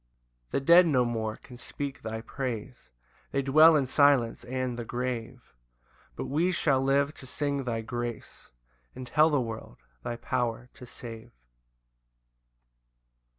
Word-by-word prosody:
8 -, -, -44 dB
The -, -, +2 dB
dead 170 Hz, +5 st, +7 dB
no 130 Hz, -5 st, +3 dB
more 110 Hz, -2 st, -2 dB
can 125 Hz, -, -14 dB
speak 140 Hz, +2 st, -6 dB
thy 110 Hz, 0 st, -5 dB
praise, 125 Hz, -1 st, -6 dB, 0.4 s
They 140 Hz, -, -1 dB
dwell 155 Hz, +4 st, +7 dB
in 140 Hz, -3 st, +2 dB
silence 135 Hz, -3 st, +3 dB
and 130 Hz, 0 st, -3 dB
the -, -, -3 dB
grave; 120 Hz, 0 st, -5 dB, 0.6 s
But -, -, -4 dB
we 155 Hz, +7 st, +1 dB
shall 140 Hz, -6 st, +2 dB
live 140 Hz, +2 st, +2 dB
to 130 Hz, -, -12 dB
sing 140 Hz, 0 st, -2 dB
thy 115 Hz, -2 st, -2 dB
grace, 120 Hz, -, -6 dB, 0.4 s
And 130 Hz, 0 st, -7 dB
tell 155 Hz, +5 st, +4 dB
the 145 Hz, -3 st, +2 dB
world 115 Hz, -, -6 dB, 0.2 s
thy 120 Hz, -, -4 dB
power 120 Hz, 0 st, -3 dB
to 125 Hz, -, -12 dB
save. 115 Hz, -2 st, -9 dB
125 Hz, 145 wpm, -28 LUFS, 120-140 Hz, 0.6 s, dead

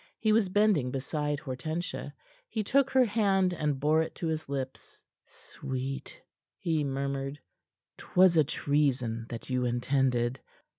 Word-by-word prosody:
He 220 Hz, -, +1 dB
was 215 Hz, -3 st, +3 dB
bending 200 Hz, -9 st, +3 dB
beside 145 Hz, +2 st, -2 dB
Hortensia. 150 Hz, +4 st, -4 dB, 0.4 s
He 220 Hz, -2 st, -2 dB
took 270 Hz, +5 st, +3 dB
her 260 Hz, -1 st, +4 dB
hand, 195 Hz, -4 st, +2 dB
and 150 Hz, -4 st, -1 dB
bore 155 Hz, +3 st, +3 dB
it 160 Hz, -, -4 dB
to -, -, -4 dB
his 160 Hz, -2 st, -2 dB
lips. 135 Hz, -2 st, -6 dB, 0.2 s
"Sweet," 135 Hz, +1 st, -6 dB, 0.4 s
he 160 Hz, -3 st, 0 dB
murmured, 140 Hz, 0 st, -3 dB, 0.6 s
"'twas 180 Hz, -1 st, +4 dB
a 155 Hz, -, +6 dB
treason 130 Hz, -6 st, 0 dB
that 115 Hz, +2 st, -7 dB
you 125 Hz, 0 st, +1 dB
intended. 125 Hz, 0 st, +1 dB
145 Hz, 135 wpm, -29 LUFS, 130-180 Hz, 0.6 s, a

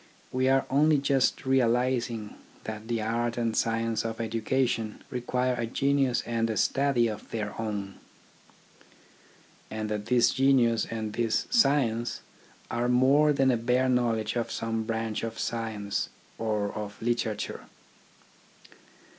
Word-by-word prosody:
We 130 Hz, +1 st, +1 dB
are 135 Hz, 0 st, +3 dB
only 150 Hz, +2 st, +4 dB
just 140 Hz, -2 st, +1 dB
realising 125 Hz, -3 st, +1 dB, 0.3 s
that 110 Hz, 0 st, -6 dB
the 115 Hz, -2 st, -1 dB
art 115 Hz, +2 st, -1 dB
and 115 Hz, -2 st, 0 dB
science 115 Hz, -1 st, 0 dB
of 115 Hz, -1 st, -4 dB
educa 115 Hz, +3 st, 0 dB
tion 110 Hz, -2 st, -4 dB
require 125 Hz, 0 st, 0 dB
a 120 Hz, -2 st, -2 dB
genius 135 Hz, 0 st, +1 dB
and 115 Hz, -1 st, 0 dB
a 110 Hz, -, -2 dB
study 135 Hz, -4 st, +2 dB
of 110 Hz, -2 st, -6 dB
their 105 Hz, -2 st, -3 dB
own; 100 Hz, -3 st, -4 dB, 1.7 s
and 110 Hz, -1 st, -4 dB
that 105 Hz, 0 st, -3 dB
this 125 Hz, -1 st, +4 dB
genius 130 Hz, -4 st, +3 dB
and 110 Hz, -2 st, -4 dB
this 115 Hz, -1 st, 0 dB
science 135 Hz, -, +2 dB, 0.5 s
are 120 Hz, +1 st, 0 dB
more 135 Hz, +5 st, +5 dB
than 135 Hz, -2 st, +3 dB
a 120 Hz, -, +2 dB
bare 125 Hz, +3 st, +1 dB
knowledge 115 Hz, -3 st, +1 dB
of 120 Hz, -1 st, -2 dB
some 115 Hz, -1 st, -2 dB
branch 115 Hz, -1 st, -2 dB
of 115 Hz, 0 st, -4 dB
science 110 Hz, -3 st, -2 dB, 0.3 s
or 105 Hz, -2 st, -1 dB
of 105 Hz, -1 st, -6 dB
literature. 115 Hz, -2 st, -2 dB
115 Hz, 135 wpm, -28 LUFS, 110-130 Hz, 1.7 s, more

